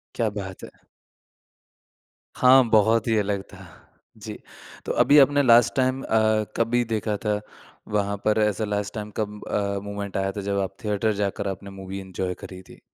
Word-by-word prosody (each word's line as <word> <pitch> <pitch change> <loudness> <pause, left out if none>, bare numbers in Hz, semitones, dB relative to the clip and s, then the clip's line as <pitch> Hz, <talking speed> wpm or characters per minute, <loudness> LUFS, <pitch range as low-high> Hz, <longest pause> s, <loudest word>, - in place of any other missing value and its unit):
क्या 115 -2 0
बात 95 -1 -8
है। - - -13 1.5
हाँ, 130 +1 +6
बहुत 110 +1 +3
ही 110 - +2
अलग 100 -1 0
था। 95 -1 -12 0.5
जी, - - -8 0.5
तो - - -2
अभी 145 - +5
आपने 145 +1 +5
लास्ट 120 -1 +5
टाइम 130 0 +1
अ, 110 -1 +2
कभी 120 +1 +2
देखा 110 -2 -2
था 105 -1 +1 0.6
वहाँ 100 0 0
पर 110 0 +3
ऐसा 105 0 0
लास्ट 105 0 -3
टाइम 105 -1 -6
कब 105 -1 -4
अ, 100 -1 -1
मूवमेंट 100 -1 -5
आया 95 0 0
था - - -2
जब 100 0 -1
आप 95 0 -3
थिएटर 105 +1 0
जाकर 100 0 -2
आपने 100 +1 -6
मूवी 95 +1 -6
एन्जॉय 95 -1 -4
करी 95 -1 -9
थी? - - -14
105 Hz, 170 wpm, -24 LUFS, 100-110 Hz, 1.5 s, हाँ